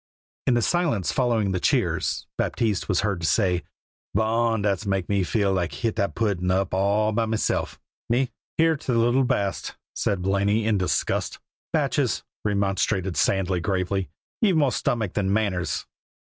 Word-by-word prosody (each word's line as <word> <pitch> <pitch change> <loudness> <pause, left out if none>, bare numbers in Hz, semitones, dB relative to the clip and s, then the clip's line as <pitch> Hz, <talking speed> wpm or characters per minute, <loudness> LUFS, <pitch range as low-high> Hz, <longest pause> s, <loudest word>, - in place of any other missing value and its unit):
In 125 - +4
the 120 - +2
silence 140 - +1
following 115 -2 +1
the 90 - 0
cheers - - 0
Baptiste 110 -5 -1
was 95 - +2
heard 100 -4 -1
to 85 - 0
say: 90 -5 +2 0.5
"Bon! 110 +1 +1
Dat's 100 -2 0
mak 95 -2 0
me 100 -1 +1
feel 100 +1 +1
lak 90 -2 0
hit 115 -3 -1
dat 100 - 0
puddin' 100 -5 0
all 100 +3 +1
hup 115 0 0
meself, 110 -1 -1 0.3
me." 125 +1 +1 0.3
"Hear 160 -1 +4
till 130 -3 -2
the - - +3
little 125 +3 +3
baste!" 100 -5 -1 0.2
said 95 -3 -1
Blaney 100 +3 +1
in 110 -3 +2
disgust. 95 - -1 0.3
"Batchees," - - +1 0.2
remonstrated 100 -2 0
Sandy 95 -2 +1
gravely, 95 +1 -1 0.3
"ye've 195 -7 +4
more 145 -4 +3
stomach 110 -7 -1
than 95 -2 0
manners." 100 -4 0
100 Hz, 155 wpm, -25 LUFS, 95-115 Hz, 0.5 s, In